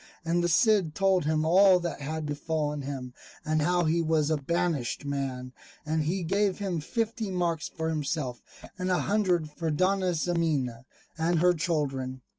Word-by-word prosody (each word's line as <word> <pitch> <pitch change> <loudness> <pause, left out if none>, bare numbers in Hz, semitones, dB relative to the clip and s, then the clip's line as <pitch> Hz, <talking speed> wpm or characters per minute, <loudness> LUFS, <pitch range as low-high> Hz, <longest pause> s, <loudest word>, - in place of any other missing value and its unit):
And 170 +1 +1
the - - +2
Cid 185 -2 +3
told 190 -4 +2
him 155 0 +1
all 185 +2 +6
that 170 -4 -4
had 155 +2 -3
befallen 150 0 -2
him, 135 -2 -6 0.3
and 155 0 +1
how 175 +3 +2
he 165 +1 +2
was 160 -2 +1
a 155 - +2
banished 150 -4 -1
man; 130 -3 -3 0.3
and 155 +1 0
he 180 +3 -1
gave 195 +3 +1
him 190 -5 -2
fifty 225 +5 -2
marks 170 -4 -1
for 160 0 -4
himself, 145 -5 -2 0.4
and 185 0 -1
a 180 - +2
hundred 180 -6 +1
for 165 +2 -3
Dona 185 +3 +1
Ximena 155 -8 -1 0.3
and 165 +1 +2
her 180 +2 +4
children. 135 -6 -2
160 Hz, 165 wpm, -28 LUFS, 150-180 Hz, 0.4 s, all